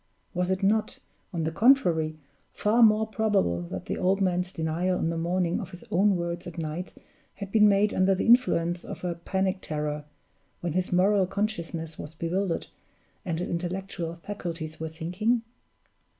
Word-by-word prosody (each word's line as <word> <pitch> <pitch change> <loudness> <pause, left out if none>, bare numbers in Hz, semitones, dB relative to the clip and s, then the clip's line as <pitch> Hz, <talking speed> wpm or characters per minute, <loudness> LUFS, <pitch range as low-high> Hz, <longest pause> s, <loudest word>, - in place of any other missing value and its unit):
Was 180 0 0
it 190 +1 0
not, 215 +2 +2 0.3
on 170 -4 -2
the 160 - -1
contrary, 170 - +3 0.4
far 220 +3 +2
more 220 -1 +6
probable 210 - +1
that 95 -1 -5
the - - -3
old 190 +2 +2
man's 180 -1 +1
denial 170 +3 0
in 165 - 0
the - - -2
morning 175 +1 0
of - - -6
his 180 +1 -10
own 200 +2 +4
words 170 0 -3
at 175 - -9
night 160 +2 -4 0.4
had 200 -2 -7
been 210 -1 +6
made 205 +1 +3
under 190 +1 +3
the 185 - -1
influence 175 -8 +3
of - - -8
a 175 -1 -1
panic 190 +3 -1
terror, 150 -1 -3 0.5
when 175 -3 -3
his 185 +1 0
moral 190 +1 +4
consciousness 170 -6 -3
was 155 +2 -8
bewildered, 170 +2 -1 0.6
and 170 -5 -2
his 175 - -2
intellectual 175 -1 -3
faculties 170 -4 -6
were 160 0 -3
sinking? 180 +9 0
180 Hz, 165 wpm, -27 LUFS, 165-200 Hz, 0.6 s, more